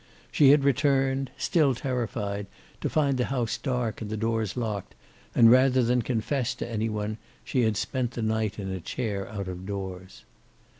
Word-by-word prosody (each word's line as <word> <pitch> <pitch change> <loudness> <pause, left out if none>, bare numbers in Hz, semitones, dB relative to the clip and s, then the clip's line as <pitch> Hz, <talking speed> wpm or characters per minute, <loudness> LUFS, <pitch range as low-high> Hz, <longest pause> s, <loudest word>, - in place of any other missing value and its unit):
She 145 -3 +6
had 145 0 +6
returned, 135 -1 +2
still 150 -6 +2
terrified, 110 -6 -3 0.3
to - - -2
find 140 -4 +2
the 125 - +2
house 125 -4 -1
dark 125 -5 -2
and 105 - -5
the 110 - -3
doors 115 -1 -1
locked, 110 -5 -3 0.4
and 115 -1 +7
rather 130 0 +5
than 125 +1 +2
confess 125 +2 -1
to - - -5
any 115 -1 -1
one, 105 0 -3 0.2
she 130 - 0
had 110 -3 +1
spent 120 +5 -1
the 115 - -3
night 110 -1 0
in 95 -2 -4
a 95 - -3
chair 100 -2 -3
out 100 -3 -5
of 90 0 -6
doors. 95 -2 -6
115 Hz, 180 wpm, -27 LUFS, 105-130 Hz, 0.4 s, and